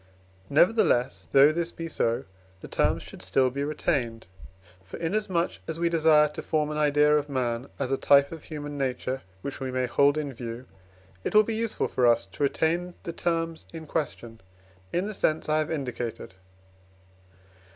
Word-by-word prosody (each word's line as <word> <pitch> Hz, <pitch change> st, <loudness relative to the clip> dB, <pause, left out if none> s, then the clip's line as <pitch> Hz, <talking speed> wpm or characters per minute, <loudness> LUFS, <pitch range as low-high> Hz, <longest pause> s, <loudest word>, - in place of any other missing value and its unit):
Nevertheless, 160 Hz, -, +3 dB
though 140 Hz, +2 st, +7 dB
this 170 Hz, +1 st, -2 dB
be 165 Hz, -, -6 dB
so, 115 Hz, -7 st, 0 dB, 0.4 s
the -, -, -8 dB
terms -, -, +1 dB
should -, -, -11 dB
still 125 Hz, +8 st, +2 dB
be 140 Hz, +2 st, -3 dB
retained. 140 Hz, -6 st, -1 dB, 0.6 s
For, 95 Hz, -, -9 dB
inasmuch 175 Hz, 0 st, -1 dB
as 160 Hz, 0 st, -4 dB
we 170 Hz, 0 st, +2 dB
desire 155 Hz, -2 st, +5 dB
to 150 Hz, -, -7 dB
form 155 Hz, -1 st, 0 dB
an 150 Hz, -, -3 dB
idea 150 Hz, 0 st, +4 dB
of 150 Hz, -1 st, 0 dB
man 125 Hz, -2 st, -1 dB
as 135 Hz, -2 st, -2 dB
a 135 Hz, -, +2 dB
type 140 Hz, 0 st, +5 dB
of 165 Hz, -2 st, -9 dB
human 145 Hz, -2 st, -6 dB
nature 130 Hz, 0 st, -2 dB, 0.2 s
which 140 Hz, -, -5 dB
we 130 Hz, -, -3 dB
may 130 Hz, 0 st, 0 dB
hold 140 Hz, +4 st, +3 dB
in 145 Hz, -3 st, -3 dB
view, 120 Hz, +1 st, -7 dB, 0.6 s
it -, -, -3 dB
will 215 Hz, -, +8 dB
be 225 Hz, -, -3 dB
useful 225 Hz, 0 st, -1 dB
for 125 Hz, -1 st, +2 dB
us 115 Hz, -3 st, +3 dB
to 95 Hz, +5 st, -12 dB
retain 170 Hz, +5 st, 0 dB
the 170 Hz, -, -5 dB
terms 165 Hz, -1 st, -2 dB
in 160 Hz, -1 st, -7 dB
question, 120 Hz, -7 st, -4 dB, 0.5 s
in 180 Hz, +2 st, 0 dB
the 215 Hz, -, -4 dB
sense 155 Hz, -5 st, 0 dB
I 155 Hz, 0 st, +2 dB
have 155 Hz, -, -1 dB
indicated. 125 Hz, -9 st, -4 dB
150 Hz, 175 wpm, -27 LUFS, 130-165 Hz, 0.6 s, will